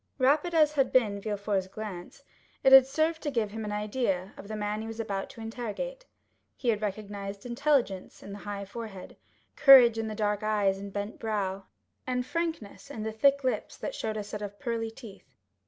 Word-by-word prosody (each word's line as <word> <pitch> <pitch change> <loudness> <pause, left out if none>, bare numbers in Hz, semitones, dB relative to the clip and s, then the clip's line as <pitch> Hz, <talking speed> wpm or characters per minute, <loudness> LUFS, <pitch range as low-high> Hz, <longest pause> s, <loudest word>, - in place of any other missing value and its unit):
Rapid 295 +6 +2
as 305 -2 +5
had 270 -3 +2
been 210 -6 +2
Villefort's 200 -2 -1
glance, 200 +4 -8 0.4
it 265 - +6
had 265 -1 +10
served 315 +3 0
to 295 - -2
give 230 -6 -1
him 220 +1 -5
an 210 - -4
idea 210 -3 -1
of 200 - -11
the 215 - -5
man 210 0 -2
he 220 - -6
was 225 0 -7
about 195 -3 -3
to 260 -4 -11
interrogate. 245 - -5 0.5
He 245 - -1
had 215 -2 +1
recognized 200 -1 -5
intelligence 245 -6 0
in 200 - -9
the 200 - -7
high 200 -1 -5
forehead, 205 -2 -8 0.4
courage 250 -6 +8
in 225 - -2
the 215 - -4
dark 210 0 0
eye 215 -1 0
and 195 +1 -4
bent 205 +2 -5
brow, 200 -3 -2 0.4
and 250 -1 -1
frankness 320 -5 -4
in 225 -6 -6
the 220 - -2
thick 280 +5 +3
lips 255 - -2
that - - -4
showed 220 - -3
a 210 - -3
set 210 +1 -7
of 205 -1 -6
pearly 230 -3 -2
teeth. 225 -3 -13
220 Hz, 195 wpm, -29 LUFS, 205-260 Hz, 0.5 s, had